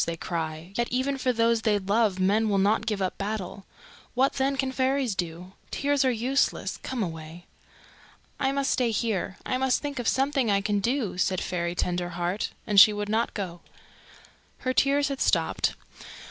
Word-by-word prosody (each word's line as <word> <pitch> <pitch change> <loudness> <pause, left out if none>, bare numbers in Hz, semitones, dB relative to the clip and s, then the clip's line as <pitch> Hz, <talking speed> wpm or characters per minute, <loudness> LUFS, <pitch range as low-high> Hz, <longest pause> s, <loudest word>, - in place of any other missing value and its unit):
they 170 0 -3
cry. 165 +1 -4
Yet 240 0 0
even 265 +2 -1
for 255 0 +1
those 230 -1 +2
they 215 -2 +2
love 200 0 +1
men 210 +4 +2
will 200 - +2
not 210 +3 +2
give 210 -3 0
up 185 - -3
battle. 200 -1 -4 0.5
What, 265 +2 +3
then, 270 +1 0
can 265 -1 0
fairies 260 -2 +1
do? 175 0 -5 0.2
Tears 285 -1 +1
are 260 - +3
useless. 255 +3 0
Come 255 -4 -3
away." 165 0 -7 0.9
"I 270 -1 +1
must 275 0 0
stay 245 -2 +2
here. 215 -4 -1
I 255 - -1
must 265 -1 +2
think 285 -3 -5
of 240 - -2
something 270 -3 +1
I 200 -1 +3
can 205 0 0
do," 230 -4 -1
said 185 0 +1
Fairy 175 -1 -2
Tenderheart; 175 +2 -2 0.2
and 205 -2 +5
she 215 - +10
would 205 0 -3
not 225 +2 0
go. 175 -4 -5 1.0
Her 255 - 0
tears 280 +2 +3
had 275 -1 -4
stopped. - - +1
215 Hz, 175 wpm, -26 LUFS, 185-260 Hz, 1.0 s, she